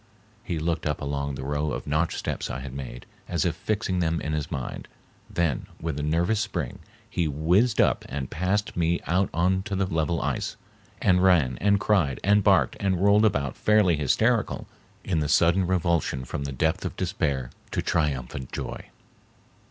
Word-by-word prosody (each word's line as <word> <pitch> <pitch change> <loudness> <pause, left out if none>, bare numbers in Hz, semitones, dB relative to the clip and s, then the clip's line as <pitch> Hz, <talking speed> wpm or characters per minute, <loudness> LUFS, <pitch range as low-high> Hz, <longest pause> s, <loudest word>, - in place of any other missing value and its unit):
He 85 -8 -3
looked 80 0 -1
up 75 - -1
along 70 -1 -2
the 65 - -6
row 75 +2 -1
of - - -4
notched 75 +3 0
steps - - -3
I 65 - -4
had 65 -1 -7
made, 65 -3 -7 0.2
as 85 +1 0
if 85 -3 0
fixing 100 0 -1
them 85 -1 +1
in 75 - -3
his 75 -2 -2
mind, 65 -3 -5 0.4
then 85 -7 -1
with 80 -3 -3
a - - -2
nervous 85 +8 +1
spring 90 - -3 0.3
he 85 - -1
whizzed 90 - +2
up - - +3
and 65 0 -3
passed 105 +5 -1
me 85 0 +1
out 95 +3 +1
on 90 +3 +2
to 100 0 -4
the 95 0 +1
level 80 -1 0
ice, - - -2 0.5
and 90 -1 +4
ran 85 -9 +4
and 100 0 +4
cried 90 - +2
and 100 +1 +4
barked - - +4
and 95 -2 0
rolled 105 +2 +5
about 75 - 0
fairly 105 -5 +4
hysterical 75 -3 +1 0.4
in 85 -5 0
the 75 -2 -1
sudden 85 +5 +4
revulsion 85 -7 0
from 70 +2 -4
the 70 - -3
depth 80 +7 0
of - - -4
despair 75 -9 -1 0.2
to - - -2
triumphant 70 -5 -1
joy. - - -5
85 Hz, 180 wpm, -26 LUFS, 70-95 Hz, 0.5 s, rolled